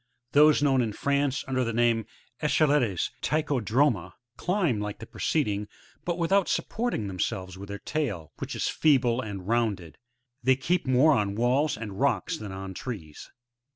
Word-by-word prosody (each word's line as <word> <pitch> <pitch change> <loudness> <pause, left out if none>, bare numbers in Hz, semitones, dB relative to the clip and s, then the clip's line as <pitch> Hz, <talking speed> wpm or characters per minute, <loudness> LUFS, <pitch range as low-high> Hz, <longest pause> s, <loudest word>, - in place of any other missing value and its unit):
Those 150 0 +5
known 135 -3 +3
in 110 -3 -1
France 140 +2 0
under 130 -1 0
the 115 - -1
name 120 0 +3
of 110 - -8 0.4
echelettes, 140 - +2
— - - -36
Tichodroma,— 130 - +1 0.2
climb 175 - 0
like 105 0 -4
the 115 - -9
preceding, 105 -7 -1 0.4
but 175 -1 -1
without 180 +3 +2
supporting 235 - -1
themselves 95 0 -3
with 100 +1 -9
their 100 - -4
tail, 100 - -3
which - - -5
is - - -1
feeble 130 -5 +3
and 100 -5 -7
rounded; 105 -9 -1 0.4
they 130 +1 +4
keep 170 +5 -1
more 130 +5 +5
on 100 -5 0
walls 125 +6 +1
and 105 -3 -7
rocks - - +1
than 105 -2 -7
on 95 0 -6
trees. 90 - -7
120 Hz, 160 wpm, -27 LUFS, 100-145 Hz, 0.4 s, Those